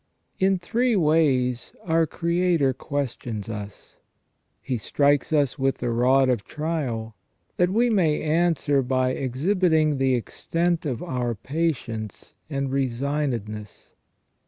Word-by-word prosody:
In 190 0 +3
three 230 +7 0
ways 145 -8 +2
our 165 -1 +2
Creator 170 -5 +1
questions 125 -6 -4
us. 105 -2 -8 0.6
He 125 -3 -3
strikes 145 +6 +1
us 145 -4 +1
with 135 0 +1
the 120 -1 -2
rod 130 +3 +4
of 120 -6 +1
trial, 130 -9 -3 0.4
that 180 0 +3
we 230 +6 +2
may 170 -8 +2
answer 155 -3 +2
by 130 0 +1
exhibiting 155 +3 +1
the 130 -1 +3
extent 165 +7 -1
of 125 -5 -3
our 125 -2 -2
patience 120 - -3 0.2
and 140 -2 -2
resignedness. 125 -5 -2
140 Hz, 115 wpm, -24 LUFS, 125-165 Hz, 0.6 s, rod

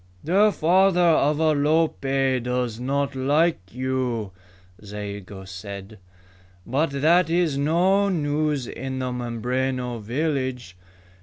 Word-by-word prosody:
"The 200 +6 +4
father 180 +2 +3
of 155 -4 +3
Alope 145 -4 +1
does 125 -2 -2
not 140 +2 -1
like 150 +6 +2
you," 125 -4 -2 0.5
Zayigo 100 -1 -7
said. 100 +2 -9 0.7
"But 145 +7 0
that 160 +5 +3
is 170 -3 +1
no 180 +8 +2
news 150 -5 0
in 130 +2 -5
the 130 -1 -2
Mimbreno 125 +1 -2
village. 130 - -3
135 Hz, 100 wpm, -24 LUFS, 120-155 Hz, 0.7 s, The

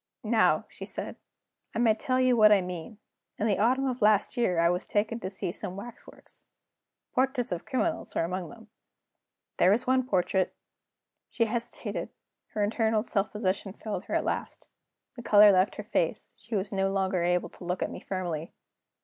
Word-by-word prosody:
"Now," 220 0 +3
she - - -9
said, - - -5 0.6
"I - - -1
may 230 -2 +4
tell 255 +3 -1
you 255 -1 +4
what 215 -2 +7
I 205 - +7
mean. 180 +3 -6 0.4
In 210 - -1
the 205 -3 +1
autumn 255 +5 +3
of 255 -2 -2
last 210 +2 +3
year 235 -8 +1
I 170 0 +4
was 180 +1 -1
taken 215 +3 0
to 185 - -4
see 190 -2 -4
some 180 0 -6
waxworks. 225 +5 -12 0.7
Portraits 255 -1 0
of 175 -1 -3
criminals 285 +4 -2
were - - +2
among 180 +1 -3
them. 225 -2 -14 0.9
There 180 - +5
was 225 +6 +3
one 260 0 +3
portrait 185 -2 +1 0.4
" - - -59
She 230 - +1
hesitated; 235 +1 -4 0.4
her 210 - 0
infernal 220 0 +1
self 205 -4 -1
possession 195 -2 -2
failed 215 0 -5
her - - -3
at - - +1
last. - - -4 0.5
The 240 - -8
color 210 -2 +7
left 185 +1 +3
her - - -6
face; - - -1
she 230 - -7
was 200 +1 -2
no 195 -1 +1
longer 190 -2 0
able 175 +1 +1
to - - -14
look 180 +1 -2
at - - -3
me - - -7
firmly. 175 -4 -4
210 Hz, 185 wpm, -28 LUFS, 185-235 Hz, 0.9 s, what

